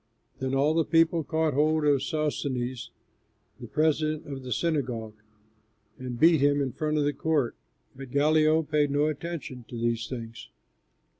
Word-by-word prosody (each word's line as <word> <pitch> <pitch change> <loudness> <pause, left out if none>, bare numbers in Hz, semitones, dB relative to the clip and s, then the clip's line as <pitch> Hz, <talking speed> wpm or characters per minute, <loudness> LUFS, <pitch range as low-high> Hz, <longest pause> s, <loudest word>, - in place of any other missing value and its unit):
Then 130 0 -1
all 145 +3 +3
the 165 0 +2
people 165 0 +3
caught 160 0 0
hold 155 +2 +2
of 145 -3 +3
Sosthenes, 135 -4 -2 0.7
the - - -8
president 155 0 0
of 135 -2 -6
the 130 -1 -8
synagogue, 125 -9 -1 0.9
and 125 -2 -6
beat 165 -2 +5
him 145 0 +3
in 135 -2 -1
front 155 +1 -2
of 150 - +2
the 145 0 0
court; 150 -7 0 0.4
but 135 -1 -9
Gallio 155 +3 +3
paid 150 -1 +1
no 145 +1 +2
attention 155 -4 -5
to 120 - -7
these 115 -1 -1
things. 115 -3 -7
145 Hz, 155 wpm, -27 LUFS, 130-155 Hz, 0.9 s, beat